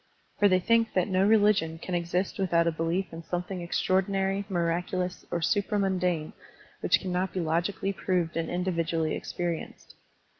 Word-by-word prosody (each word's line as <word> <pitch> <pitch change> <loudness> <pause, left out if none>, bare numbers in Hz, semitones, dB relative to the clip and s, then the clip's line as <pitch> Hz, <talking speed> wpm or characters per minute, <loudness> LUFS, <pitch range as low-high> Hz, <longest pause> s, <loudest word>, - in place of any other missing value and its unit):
For 205 - +6
they 185 -2 +4
think 230 +3 +2
that 185 -2 +2
no 185 0 +2
religion 205 -7 +3
can 180 +2 -6
exist 175 +3 -1
without 170 -3 +2
a 170 - +2
belief' 165 +3 -2
in 165 - -6
something 180 +2 -4
extraordi 185 +2 +1
nary, 195 0 0
miractilous, 180 +1 -1
or 170 - -2
supramundane 185 -4 0 0.5
which - - +3
cannot 185 0 -2
be 185 - -2
logically 175 +4 -1
proved 180 -3 -1
and 165 -1 -1
individually 170 -3 -1
experi 175 -2 -2
enced. - - -13
180 Hz, 155 wpm, -28 LUFS, 170-195 Hz, 0.5 s, For